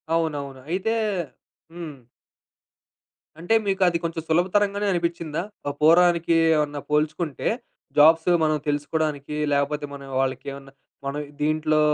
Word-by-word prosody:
అవునవును. 145 -5 -2
అయితే 190 +6 0 0.8
హ్మ్. 165 -5 -7 1.4
అంటే, 175 +7 -1
మీకు 195 -1 0
అది 170 -1 +2
కొంచెం 165 -1 -3
సులభతరంగానే 200 +5 +2
అనిపిచ్చిందా? 170 -2 -2 0.3
ఆ - - -1
పోరానికి 170 +1 +5 0.2
ఏమన్నా 150 -1 -1
పోల్చుకుంటే 155 0 0 0.5
జాబ్సు 160 +3 +6
మనం 155 -1 +2
తెలుసుకోడానికి, 150 0 -1 0.2
లేపోతే 145 +1 0
మనం 140 -1 -10
వాళ్ళకేవన్నా 135 +1 -3 0.3
మనం 140 +2 -2 0.2
దీంట్లో 155 0 +2
155 Hz, 105 wpm, -24 LUFS, 145-170 Hz, 1.4 s, జాబ్సు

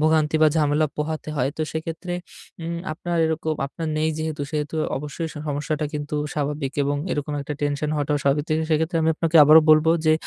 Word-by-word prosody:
ভোগান্তি 155 0 +3
বা 155 - +7
ঝামেলা 150 0 +2
পোহাতে 155 +1 -3
হয়। 130 +1 +1
তো 160 - -1
সেক্ষেত্রে 165 +3 -4 0.5
উম 170 +1 -3 0.2
আপনার 175 +2 -3
এরকম, 160 0 -1
আপনার 160 +3 -5
নেই 155 +1 +1
যেহেতু, 155 -2 -3
সেহেতু 150 0 -3 0.2
অবশ্যই 150 +3 -4 0.2
সমস্যাটা 150 +1 -2
কিন্তু 150 0 -4 0.2
স্বাভাবিক 145 -2 -2
এবং 145 +1 0 0.2
এরকম 145 0 -3
একটা 150 +1 -4
টেনশন 145 +1 -1
হওয়াটাও 145 0 0
স্বাভাবিক। 140 +1 +2
তো 155 - 0 0.2
সেক্ষেত্রে 160 +2 +1
আমি 160 - +3
আপনাকে 165 +1 +1
আবারো 155 +2 +8
বলবো, 155 +1 +6 0.2
যে 155 - +6
155 Hz, 180 wpm, -23 LUFS, 145-160 Hz, 0.5 s, আবারো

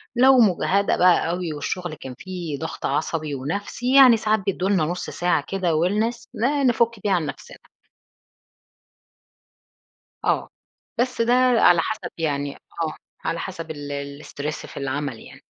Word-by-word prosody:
لو 260 +1 +6
مُجهدَة 200 -1 +3
بقى 175 -2 +4
أوي 175 -2 -2
والشغل 175 +3 -4
كان 130 -3 -9
فيه 180 -6 -5
ضغط 160 - -5
عصبي 155 -2 -1
ونفسي، 200 - -2
يعني 255 -4 +8
ساعات 215 0 +1
بيدّوا 190 0 -1
لنا 190 -6 +3
نص 175 +3 -4
ساعة 175 -5 0
كده 190 -2 -1
wellness 210 +9 0
ن 275 +3 +1
نفُك 235 -2 +2
بيها 205 - +2
عن 175 -4 +1
نفسنا. - - -8 2.7
آه، - - +1 0.5
بس 250 -1 0
ده 240 +1 +3 0.3
على 175 -2 +6
حسب 220 +3 -4
يعني 145 -3 -2
آه، 160 -2 -5 0.3
على 165 0 -1
حسب 165 -4 -6
ال 145 0 -6
الstress 150 +2 -5
في - - -12
العمل 140 -3 -3
يعني. - - -14
175 Hz, 145 wpm, -23 LUFS, 150-215 Hz, 2.7 s, يعني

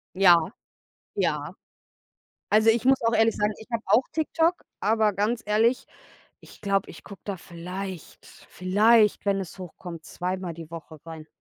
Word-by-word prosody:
Ja, 180 -2 +5 0.6
ja. - - -1 1.0
Also, 220 +2 +5
ich 230 +1 +3
muss 265 0 +4
auch 230 - +2
ehrlich 225 0 +3
sagen, 210 +1 0
ich 220 - -13
habe 230 -1 -2
auch 215 +7 +4
TikTok, 325 +2 +1 0.3
aber 215 0 +2
ganz 215 +4 0
ehrlich, 225 +4 +2 0.6
ich - - -16
glaube, 195 -1 0
ich - - -12
gucke 200 - -11
da 200 -2 -4
vielleicht, 180 +1 -8
vielleicht, 210 +4 +2
wenn 195 -1 +2
es 190 0 -8
hochkommt, 175 -2 -9
zweimal 180 0 -4
die 165 -1 -10
Woche 160 -1 -9
rein. 160 -1 -9
200 Hz, 155 wpm, -26 LUFS, 180-225 Hz, 1.0 s, Ja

